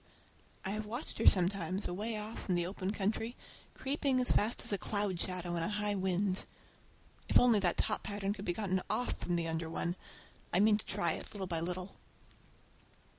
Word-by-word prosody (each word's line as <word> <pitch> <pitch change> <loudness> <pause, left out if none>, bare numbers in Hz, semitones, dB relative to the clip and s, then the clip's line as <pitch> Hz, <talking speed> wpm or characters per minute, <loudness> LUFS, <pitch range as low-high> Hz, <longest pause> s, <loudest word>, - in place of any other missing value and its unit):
I 190 - 0
have 215 +1 -3
watched 240 +7 -4
her - - +3
sometimes 185 0 +3
away 215 +5 -2
off 210 0 -6
in 180 - +3
the 175 -1 +1
open 185 +1 -3
country, 220 +4 -1 0.4
creeping 270 -1 +1
as 250 - +3
fast 220 +3 +2
as - - -1
a - - +2
cloud 205 -4 0
shadow 180 -2 -2
in 170 - -1
a 165 - 0
high 210 0 0
wind. 190 0 0 0.8
If - - +6
only 240 -4 +5
that 180 -3 +2
top - - +1
pattern 205 -1 -2
could 205 -1 -8
be - - +1
gotten 190 -2 0
off 250 - +1
from 175 - -1
the 170 -1 0
under 160 0 -2
one! 170 +1 -1 0.6
I 180 - +3
mean 210 +1 +5
to - - -4
try 170 - +1
it, - - -4
little 195 -2 -3
by 170 -3 0
little. 180 +3 -3
195 Hz, 195 wpm, -34 LUFS, 180-210 Hz, 0.8 s, If